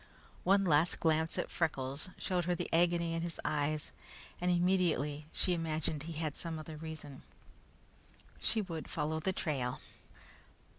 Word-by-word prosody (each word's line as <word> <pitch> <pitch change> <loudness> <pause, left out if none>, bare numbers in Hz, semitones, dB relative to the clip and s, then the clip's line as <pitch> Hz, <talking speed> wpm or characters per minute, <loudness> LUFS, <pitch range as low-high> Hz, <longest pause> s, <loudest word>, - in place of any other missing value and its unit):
One 195 +1 +5
last 160 0 +4
glance 160 0 +2
at - - -1
Freckles 140 -2 -1
showed 180 -3 0
her 180 0 +2
the - - -2
agony 170 0 +3
in 165 - -1
his 170 -1 -3
eyes, 150 0 0 0.5
and 180 - +2
immediately 175 -5 +2
she 180 - +1
imagined 160 -2 -1
he 165 +2 -5
had 155 -2 -2
some 165 -2 -3
other 155 0 -7
reason. 155 -3 -7 1.2
She 220 -2 +1
would 165 -5 -5
follow 160 +1 -1
the 190 +4 +1
trail. 135 -8 -1
160 Hz, 145 wpm, -34 LUFS, 150-175 Hz, 1.2 s, One